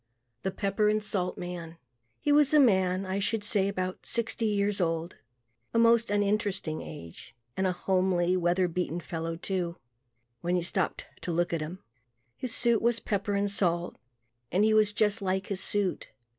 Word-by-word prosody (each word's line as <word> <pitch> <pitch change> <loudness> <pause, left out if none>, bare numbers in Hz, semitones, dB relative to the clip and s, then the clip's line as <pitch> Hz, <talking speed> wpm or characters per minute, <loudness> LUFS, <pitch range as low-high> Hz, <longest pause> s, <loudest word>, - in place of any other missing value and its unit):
The 190 - -1
Pepper 200 +2 +1
and 215 0 +1
Salt 180 -3 -2
Man 170 -2 -6 0.4
He 295 - 0
was 295 0 +5
a - - +8
man, 190 -6 +3
I 190 +1 -2
should 210 +2 -1
say 205 -2 +2
about 185 -2 -3
sixty 230 -1 0
years 205 -1 0
old, 165 0 -1 0.6
a - - +4
most 230 -1 +5
uninteresting 205 -5 0
age, 115 - -10 0.2
and 190 - +1
a - - +2
homely, 185 -1 +1
weather 180 +1 +2
beaten 175 -1 -2
fellow 165 +1 -4
too, 175 0 -3 0.6
when 175 +1 0
you 175 - +1
stopped 180 +2 -1 0.2
to 175 - -3
look 175 +1 0
at 165 - 0
him. 170 +5 -6 0.5
His 255 - -4
suit 235 -1 +2
was 235 0 +2
pepper 205 0 -1
and 200 0 +1
salt, 175 -3 0 0.6
and 190 +4 +3
he 215 0 +4
was 215 -1 +4
just 210 +1 +1
like 190 0 0
his 195 -2 -3
suit. 205 -3 0
190 Hz, 170 wpm, -29 LUFS, 175-210 Hz, 0.6 s, a